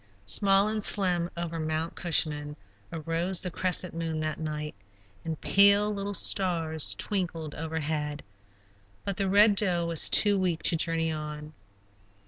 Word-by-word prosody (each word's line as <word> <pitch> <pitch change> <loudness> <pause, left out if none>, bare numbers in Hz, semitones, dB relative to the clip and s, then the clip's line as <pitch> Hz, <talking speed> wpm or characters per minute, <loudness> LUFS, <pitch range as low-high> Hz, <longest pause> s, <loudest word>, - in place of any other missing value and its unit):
Small 195 - +4
and 215 0 -2
slim 180 -4 +2
over 170 -1 -4
Mount 155 +1 -3
Cushman 150 -4 0 0.4
arose 165 +3 0
the 180 - -4
crescent 180 0 -1
moon 165 -1 -4
that 155 0 -3
night, 150 -1 -5 0.5
and 160 -1 -5
pale 200 +1 +4
little 200 0 -4
stars 165 -6 +1
twinkled 170 -7 -4
overhead, 155 -2 -4 0.8
but 200 -2 -3
the 195 -2 -1
Red 205 +2 +5
Doe 180 -4 0
was 165 -2 +3
too 205 -2 +5
weak 170 -4 -2
to - - +3
journey 165 0 -1
on. 150 0 -7
165 Hz, 135 wpm, -27 LUFS, 155-190 Hz, 0.8 s, Red